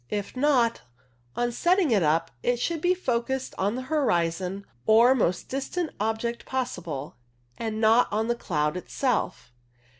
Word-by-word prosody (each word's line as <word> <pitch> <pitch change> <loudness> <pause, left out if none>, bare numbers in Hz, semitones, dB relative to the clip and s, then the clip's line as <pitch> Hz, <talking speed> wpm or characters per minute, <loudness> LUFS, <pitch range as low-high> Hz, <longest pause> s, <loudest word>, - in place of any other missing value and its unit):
If 205 +2 -4
not, 255 -4 +2 0.5
on 240 0 0
setting 345 +4 +2
it 210 -4 +4
up 165 +1 +1
it 245 -1 +1
should 330 +4 -1
be 360 +2 +3
focussed 260 -4 -2
on 200 +4 +1
the 255 - -4
horizon 190 - 0 0.2
or 230 +4 +6
most 185 -9 0
distant 300 +5 -3
object 225 +2 -2
possible, 170 - -4 0.4
and 220 -1 -3
not 225 +2 +5
on 220 +2 0
the 240 - +2
cloud 150 -9 -1
itself. 185 - -2
230 Hz, 145 wpm, -26 LUFS, 190-260 Hz, 0.5 s, or